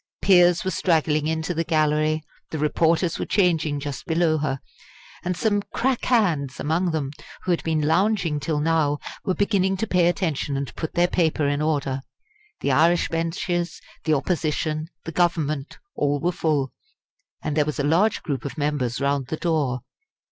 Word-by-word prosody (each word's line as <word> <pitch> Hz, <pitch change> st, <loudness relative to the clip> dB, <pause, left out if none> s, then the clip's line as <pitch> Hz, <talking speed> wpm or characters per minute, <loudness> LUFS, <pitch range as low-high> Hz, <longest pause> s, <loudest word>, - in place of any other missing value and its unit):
Peers 180 Hz, -2 st, +5 dB
were 190 Hz, -, -1 dB
straggling 155 Hz, -4 st, +1 dB
into 160 Hz, +2 st, -1 dB
the 165 Hz, 0 st, 0 dB
gallery; 155 Hz, -1 st, +1 dB, 0.3 s
the 160 Hz, -, -4 dB
reporters 165 Hz, +3 st, +1 dB
were -, -, -1 dB
changing 160 Hz, -7 st, +2 dB
just 140 Hz, -3 st, -6 dB
below 160 Hz, -1 st, +2 dB
her: 135 Hz, -3 st, -1 dB, 0.6 s
and 180 Hz, -1 st, -2 dB
some 205 Hz, -2 st, +1 dB
"crack 260 Hz, -1 st, 0 dB
hands" 170 Hz, -, +1 dB
among 170 Hz, +4 st, +1 dB
them, 150 Hz, -4 st, -2 dB, 0.3 s
who 185 Hz, -, 0 dB
had 170 Hz, -, +1 dB
been 160 Hz, -2 st, 0 dB
lounging 175 Hz, -1 st, +2 dB
till 150 Hz, +1 st, -1 dB
now, 150 Hz, -2 st, +2 dB, 0.3 s
were 185 Hz, -3 st, +1 dB
beginning 195 Hz, -2 st, +1 dB
to 220 Hz, -, -1 dB
pay 180 Hz, -4 st, +3 dB
attention 160 Hz, -6 st, -1 dB
and 140 Hz, -1 st, -4 dB
put 160 Hz, -, -5 dB
their 175 Hz, 0 st, +4 dB
paper 160 Hz, -4 st, +1 dB
in 145 Hz, +1 st, 0 dB
order. 140 Hz, -3 st, 0 dB, 0.6 s
The 140 Hz, -, +1 dB
Irish 165 Hz, +6 st, +3 dB
benches, 170 Hz, +1 st, -2 dB, 0.3 s
the 155 Hz, -1 st, +3 dB
Opposition, 155 Hz, 0 st, -1 dB, 0.2 s
the 165 Hz, -, -4 dB
Government 155 Hz, -4 st, 0 dB, 0.2 s
all 145 Hz, 0 st, 0 dB
were 175 Hz, +3 st, +1 dB
full, 150 Hz, -6 st, 0 dB, 0.7 s
and 150 Hz, -, -2 dB
there 150 Hz, -1 st, +3 dB
was 150 Hz, -, -3 dB
a -, -, +1 dB
large 175 Hz, +9 st, +2 dB
group 140 Hz, -6 st, -3 dB
of 140 Hz, -, -6 dB
members 145 Hz, -5 st, -1 dB
round 140 Hz, -1 st, 0 dB
the 160 Hz, -, -3 dB
door. 150 Hz, -8 st, 0 dB
160 Hz, 170 wpm, -24 LUFS, 145-175 Hz, 0.7 s, Peers